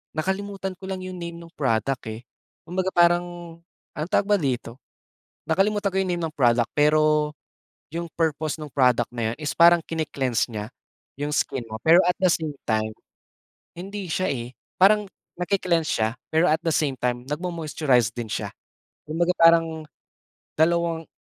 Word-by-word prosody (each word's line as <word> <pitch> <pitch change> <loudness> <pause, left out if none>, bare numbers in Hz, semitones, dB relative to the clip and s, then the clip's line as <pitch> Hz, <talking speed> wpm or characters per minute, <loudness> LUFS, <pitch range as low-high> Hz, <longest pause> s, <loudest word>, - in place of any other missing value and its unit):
nakalimutan 190 +3 -3
ko 190 - -8
lang 190 -1 -4
yung 185 -1 -6
name 170 -1 -6
nung 170 0 -12
product, 130 -1 0
eh. 110 +2 -6 0.4
Kumbaga, 185 +2 -2
parang 175 -1 +1 0.4
ang 155 +2 -3
tawag 200 - +3
ba 205 0 +3
dito 125 -5 -2 0.7
nakalimutan 200 +4 +1
ko - - -1
yung 185 - -2
name 175 - -1
ng 155 - -8
product. 120 -3 +3
Pero, 150 0 +3 0.6
yung 170 +1 -5
purpose 155 -1 0
nung 150 - -6
product 125 -4 +2
na 115 -1 -1
yun - - -6
is 150 -2 -3
parang 170 +1 +7
kine-cleanse 135 -8 -2
niya 105 -1 -5 0.5
yung 145 +2 -3
skin 135 -3 -1
mo, 110 - -5
pero 165 - +6
at 180 +1 +1
the 190 - +4
same 160 -3 -1 0.2
time 110 -1 0 0.8
hindi 195 +3 -6
siya, 185 +3 0
eh, 120 -1 -4 0.2
parang 205 +1 +4 0.3
nagke-cleanse 180 -3 0
siya, 110 0 +1 0.2
pero 160 +2 +3
at 160 - +2
the 165 - 0
same 145 -3 +1
time 125 0 -1
nag-mo-moisturize 150 - 0
din 120 -1 -5
siya. - - -3 0.6
Kumbaga, 170 +3 +1
parang 165 -1 +4 0.7
dalawang 165 0 +1
160 Hz, 160 wpm, -24 LUFS, 135-175 Hz, 0.8 s, parang